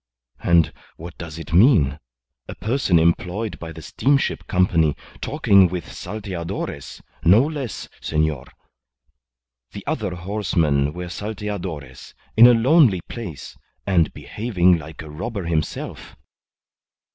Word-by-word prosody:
And 85 -2 +3 0.2
what 85 +1 -9
does 85 -2 -7
it 80 -1 -8
mean? 90 - +5 0.5
A - - -7
person 110 -6 +1
employed 90 +6 0
by 80 -1 -7
the 80 -1 -10
Steamship 140 +1 0
Company 85 -5 +2 0.3
talking 100 -2 +4
with 90 -1 -6
salteadores 90 -8 -6 0.2
no 100 +9 +6
less, 145 -6 -5
senor; 75 -4 -1 1.3
the - - -7
other 95 -4 -2
horsemen 85 -7 0
were 90 +1 -5
salteadores 95 - -6 0.2
in 115 +2 +9
a 125 - +7
lonely 120 - +4
place, 100 - -7 0.3
and 90 -5 +2
behaving 90 -6 +1
like 80 +1 -9
a 80 - -10
robber 100 +5 -4
himself! 80 -2 -3
90 Hz, 115 wpm, -22 LUFS, 80-105 Hz, 1.3 s, in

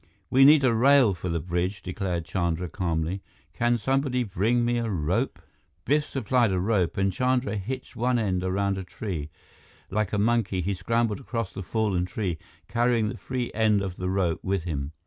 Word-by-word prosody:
"We 135 +1 +7
need 145 0 +7
a 125 -3 +4
rail 130 -2 +5
for 90 0 -5
the 85 0 0
bridge," 90 +3 -2
declared 90 -2 -3
Chandra 85 -1 -1
calmly. 85 0 -2 0.3
"Can 120 0 +2
somebody 130 +2 0
bring 115 +4 +1
me 120 0 +1
a 115 -1 -2
rope?" 80 -7 -1 0.5
Biff 150 +1 +2
supplied 125 -3 +1
a 95 - +1
rope, 95 -3 +1
and 95 0 +1
Chandra 125 -1 +1
hitched 125 +7 -5
one 125 +1 +1
end 95 -5 0
around 100 +1 0
a - - -4
tree. 90 -5 -5 0.6
Like 105 -1 0
a 105 - 0
monkey, 105 -3 +1
he 100 +3 0
scrambled 115 +3 0
across 115 -6 -4
the - - -5
fallen 95 -3 0
tree, 90 -3 -3 0.3
carrying 120 -2 +1
the - - -6
free 125 -2 -3
end 105 -2 +2
of 95 -2 -5
the 90 0 -2
rope 95 -4 0
with 95 -3 -1
him. 75 -4 -3
100 Hz, 185 wpm, -26 LUFS, 90-120 Hz, 0.6 s, We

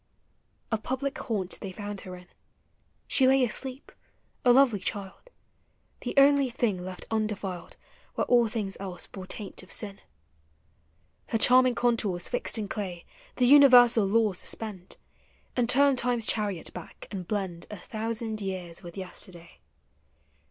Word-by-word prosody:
A 225 - 0
public 265 +4 -3
haunt 200 -6 -2
they 195 - -5
found 205 +1 -6
her 185 -1 -8
in: 180 0 -13 0.8
She 260 - +4
lay 265 0 +4
asleep, 255 +3 -3 0.5
a 245 - +6
lovely 245 -5 +5
child; 200 - -6 0.7
The - - -5
ouly 275 -2 +5
thing 230 -8 -1
left 185 0 -7
undetiled 210 -5 -3 0.4
Where - - 0
all 240 -2 +4
things 210 -3 -4
else 190 -2 -6
bore 185 -2 -10
taint 200 0 -6
of 185 - -13
sin. 200 -3 -4 1.3
Her 225 - 0
charming 255 +2 +5
contours 230 -7 0
fixed 245 - -1
in 210 -2 -3
clay 185 -5 -5 0.3
The 250 - +2
universal 245 -5 +7
law 215 0 +2
suspend. 190 0 -5 0.6
And 240 -2 +1
turn 275 +1 +4
Time's 240 -2 +1
chariot 205 -7 -1
back, 180 - -10
and 185 -4 -6
blend 190 -5 -3
A 210 - -7
thousand 220 +1 -4
years 185 -3 -5
with 175 -1 -11
yesterday. 180 -2 -10
215 Hz, 140 wpm, -27 LUFS, 190-245 Hz, 1.3 s, universal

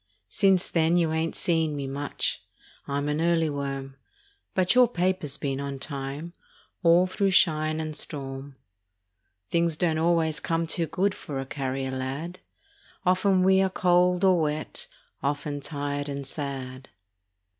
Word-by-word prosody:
Since 195 -3 +3
then 165 +1 +3
you 165 -2 +2
ain't 160 +1 -1
seen 160 -3 +1
me 140 -1 -3
much; 140 +1 -2 0.5
I'm 140 +1 -1
an 150 +2 0
early 165 -2 +2
worm. 135 -1 -4 0.6
But 185 -1 +3
your 250 0 +6
paper's 180 - -1
been 135 -2 -2
on 140 -1 -4
time 140 +4 -5 0.5
All 170 +1 +5
through 195 +2 0
shine 155 -4 +3
and 155 -1 -4
storm. 135 -2 -5 1.0
Things 170 -1 +2
don't 160 -1 +1
always 165 -2 +2
come 165 0 -1
too 165 0 0
good 185 +5 +1
For 140 -6 -6
a 135 - -3
carrier 135 -1 -3
lad. 135 +7 -4 0.7
Often 185 +1 +3
we 190 0 +5
are 190 - +2
cold 180 0 +3
or 185 -3 +5
wet, 155 - -3 0.3
Often 145 0 -2
tired 145 0 -3
and 140 -1 -4
sad. 135 -2 -6
155 Hz, 145 wpm, -26 LUFS, 140-175 Hz, 1.0 s, your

